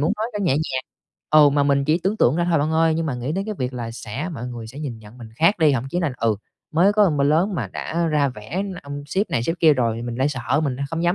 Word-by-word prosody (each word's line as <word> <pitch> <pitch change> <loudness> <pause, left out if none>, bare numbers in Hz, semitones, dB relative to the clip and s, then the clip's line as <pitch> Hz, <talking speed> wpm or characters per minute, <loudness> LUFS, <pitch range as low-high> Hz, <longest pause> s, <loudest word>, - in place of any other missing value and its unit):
muốn 155 +7 +2
nói 215 +1 -1
phải 210 - -2
nhẹ 185 -8 +2
nhàng 135 -3 -1 0.5
ừ, 150 -1 +7
mà 145 0 +2
mình 140 -1 +2
chỉ 155 +4 +2
tưởng 195 +4 0
tượng 135 - +3
ra 175 - +1
thôi 165 - +3
bạn 150 +2 0
ơi, 160 0 +3
nhưng 165 0 -1
mà 140 - -2
nghĩ 125 +4 -3
đến 195 +3 -2
cái 215 0 -4
việc 125 0 -2
là 120 -2 -5
sẽ 115 +7 -5
mọi 125 -3 -5
người 120 -2 -7
sẽ 125 +5 -10
nhìn 135 -7 -5
nhận 110 +3 -15
mình 115 - -10
khác 170 - +3
đi, 155 -3 +4
thậm 130 -2 -1
chí 175 - -1
là 160 -6 0
"Ừ, 115 -3 +1 0.3
mới 175 +5 +4
có 205 -3 +4
bao 140 -2 +1
lớn 170 +7 +2
mà - - -3
đã 170 +1 -2
ra 150 -3 +2
vẻ 130 - -5 0.2
ông 145 0 -7
sếp 195 +7 -1
này 115 - 0
sếp 165 +7 -1
kia 160 -2 +6
rồi." 120 -5 0
Thì 115 - -5
mình 120 -1 -4
lại 130 +3 +2
sợ, 135 +1 -1
mình 135 -4 -1
lại 140 - -3
không 165 0 -2
dám 175 +1 +2
145 Hz, 305 wpm, -22 LUFS, 125-165 Hz, 0.5 s, ừ